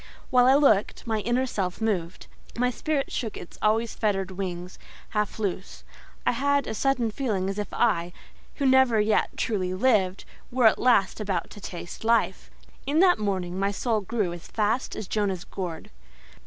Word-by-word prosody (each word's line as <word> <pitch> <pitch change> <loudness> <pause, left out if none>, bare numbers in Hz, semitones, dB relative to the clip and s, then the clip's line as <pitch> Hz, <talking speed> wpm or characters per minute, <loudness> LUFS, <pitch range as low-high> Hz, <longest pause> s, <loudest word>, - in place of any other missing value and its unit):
While 250 -1 +5
I 265 - +6
looked, 245 -9 +3
my 220 -2 0
inner 240 +4 +1
self 190 -7 -3
moved; 190 -6 -2 0.3
my 250 +1 +2
spirit 290 +1 -2
shook 220 -4 -3
its 175 - -11
always 220 +2 +1
fettered 195 -3 -1
wings 180 -1 -5 0.3
half 210 -1 -1
loose; 195 -3 -4 0.4
I - - +4
had 280 +2 +1
a - - -4
sudden 245 -1 +1
feeling 210 -7 -1
as 195 - -5
if 205 - -4
I, 175 -7 +1 0.4
who 280 - -2
never 260 -4 +5
yet 210 0 +2
truly 185 -4 -1
lived, 195 -4 +2 0.3
were 250 -1 +2
at 220 - +5
last 230 -7 +3
about 195 -5 -2
to 205 - -11
taste 175 +1 -8
life. 230 +1 +1 0.4
In 295 +3 +2
that 365 -7 +5
morning 190 -3 -2
my 195 0 +1
soul 215 +2 -1
grew 200 -3 -2
as 175 - -10
fast 220 +4 -1
as 210 - -6
Jonah's 195 -4 -1
gourd. 175 -4 -6
215 Hz, 170 wpm, -26 LUFS, 190-245 Hz, 0.4 s, I